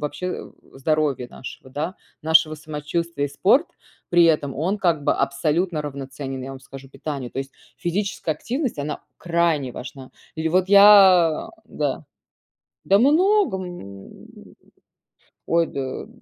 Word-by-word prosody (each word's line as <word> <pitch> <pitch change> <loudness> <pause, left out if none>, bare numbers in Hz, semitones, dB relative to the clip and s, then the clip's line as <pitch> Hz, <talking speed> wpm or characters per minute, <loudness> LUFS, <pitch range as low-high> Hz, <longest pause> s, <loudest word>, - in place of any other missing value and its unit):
вообще 180 +5 -5 0.2
здоровья 140 -3 -1
нашего, 130 +1 -11
да. 160 +7 -4 0.3
Нашего 160 0 +4
самочувствия. 150 0 -3
И - - -8
спорт 200 - +3 0.4
при 175 -1 +5
этом, 150 -5 +1
он 185 +8 -1
как 170 -6 +1
бы - - +3
абсолютно 150 +4 0
равноценен, 135 -1 -6
я 135 - -6
вам 135 - -8
скажу, 135 0 -12
питанию. 140 -3 -6
То - - -6
есть, 135 0 -5 0.2
физическая 175 -3 -2
активность 250 - -3
она 150 +1 -5 0.2
крайне 170 -6 0
важна. 130 +1 -9 0.2
Или 160 0 -2
вот 185 +2 +1
я, 195 -5 +7 0.2
да - - -3 0.8
Да 195 +1 +4
много, 350 - +3
м, 100 - -10 1.2
ой 165 0 +2
да, 135 +6 -5
155 Hz, 130 wpm, -22 LUFS, 140-180 Hz, 1.2 s, я